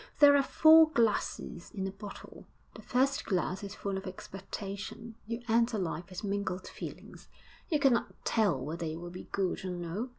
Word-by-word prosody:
There 290 -1 +8
are 280 - +6
four 315 +3 +7
glasses 225 - 0
in 190 -2 -2
a 195 - -2
bottle. 200 +1 -10 0.3
The - - -11
first 265 +2 +1
glass 185 0 -1
is 200 0 -6
full 195 -1 -3
of 195 - -9
expectation; 195 +4 -7
you 230 +1 -4
enter 230 0 +3
life 175 -2 -3
with 185 +3 -7
mingled 200 -2 -2
feelings; - - -9 0.4
you 310 - +3
cannot 265 -4 +1
tell 205 - +2
whether 160 +5 -4
it 160 +1 -4
will 175 0 -7
be 180 - -9
good 190 -2 -1
or 190 - -3
no. 180 +7 -4
200 Hz, 175 wpm, -31 LUFS, 185-235 Hz, 0.4 s, There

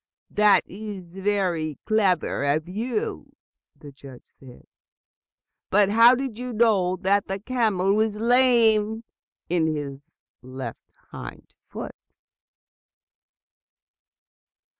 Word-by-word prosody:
"That 210 -1 +4
is 195 -4 -9
very 185 -6 -1
clever 200 -9 +1
of 150 +3 0
you," 220 +4 -4 0.4
the 145 - -13
judge 135 -2 -14
said. 130 -2 -17 1.0
"But 200 0 +3
how 230 +4 +6
did 255 -3 -5
you 250 0 -5
know 210 -5 +2
that 200 +1 +1
the 195 - -3
camel 210 -5 0
was 215 0 0
lame 225 -2 +3 0.4
in 170 -2 +1
his 145 -1 -5 0.3
left 130 -2 -9 0.2
hind - - -10 0.2
foot?" - - -7
200 Hz, 95 wpm, -24 LUFS, 160-220 Hz, 1.0 s, how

